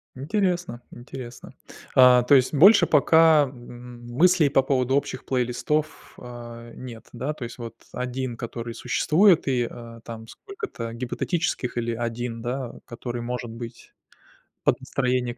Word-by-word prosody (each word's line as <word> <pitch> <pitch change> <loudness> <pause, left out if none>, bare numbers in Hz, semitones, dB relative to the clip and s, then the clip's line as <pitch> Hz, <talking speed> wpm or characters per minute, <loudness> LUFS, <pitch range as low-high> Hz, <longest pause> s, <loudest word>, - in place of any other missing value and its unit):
Интересно, 175 - -1
интересно. 120 0 -10 0.4
А, 125 -1 +7
то 135 +4 +5
есть 130 +1 +3
больше 185 +5 +7
пока 160 0 +5
м 120 -1 -12
мыслей 170 +2 +4
по 135 -1 +4
поводу 130 -1 +1
общих 140 - -2
плейлистов, 135 +5 -2
э, 120 -1 -10
нет? 120 -3 -10
Да, 130 +5 -3
то 150 -4 -8
есть 120 - -9
вот 115 -2 -8 0.2
1, 125 -1 -4
который 115 0 -6
существует 170 - +3
и, 125 -3 +1
э, 115 -1 -11
там 115 -1 -8
сколько-то 395 - -7
гипотетических, 125 +2 -2
или 115 -1 -1
1, 115 0 -4
да, 125 0 -4
который 120 0 -6
может 125 0 -4
быть 115 +1 -9 0.7
под - - +2
настроение. 125 -2 -1
125 Hz, 135 wpm, -24 LUFS, 120-145 Hz, 0.7 s, А